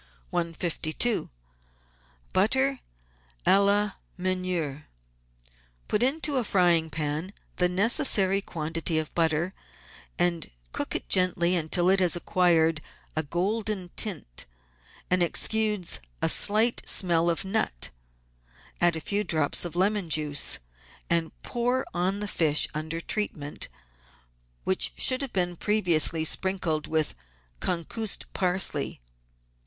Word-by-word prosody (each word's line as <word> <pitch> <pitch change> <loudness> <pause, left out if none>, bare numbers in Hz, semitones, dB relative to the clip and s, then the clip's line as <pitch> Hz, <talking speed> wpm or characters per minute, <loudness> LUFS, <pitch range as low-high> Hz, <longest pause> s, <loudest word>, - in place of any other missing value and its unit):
152— 170 +5 -1 1.0
BUTTER 265 +7 +2 0.7
A 195 - +5
LA 205 +1 +2 0.3
MEUNIERE 180 -6 -3 1.0
Put 210 - 0
into 285 +2 +1
a 250 - +1
frying 175 -5 +2
pan 155 +5 -3 0.2
the 180 0 +2
necessary 195 0 +3
quantity 165 -1 -2
of 155 -1 -3
butter, 165 +2 0 0.6
and 175 -2 -1 0.2
cook - - -4
it - - -3
gently 180 -1 +2
until 175 +1 +1
it 190 +1 +4
has 180 -1 +4
acquired 165 -3 +2 0.3
a 155 - +1
golden 190 +4 -2
tint 165 - -1 0.6
and 180 0 +3
exudes 210 +2 0 0.2
a - - +1
slight 220 +3 +4
smell 170 -2 +2
of 170 +3 -1
nut. 190 - -2 0.9
Add 175 -1 +4
a 160 - -5
few 205 +5 -1
drops 155 -3 +2
of 175 - -6
lemon 195 0 +1
juice, 150 -2 +4 0.5
and 165 -1 +1
pour 245 +2 -1
on 185 +3 -1
the 210 - -3
fish 155 -5 +3
under 160 +2 -4
treatment, 155 -8 -3 1.0
which - - +2
should 255 +1 +3
have 275 -3 -4
been 180 -2 -1
previously 170 -5 +2
sprinkled 175 -3 0
with 155 -1 0 0.5
concussed 190 +5 -1
parsley. 185 0 0
180 Hz, 115 wpm, -26 LUFS, 160-200 Hz, 1.0 s, A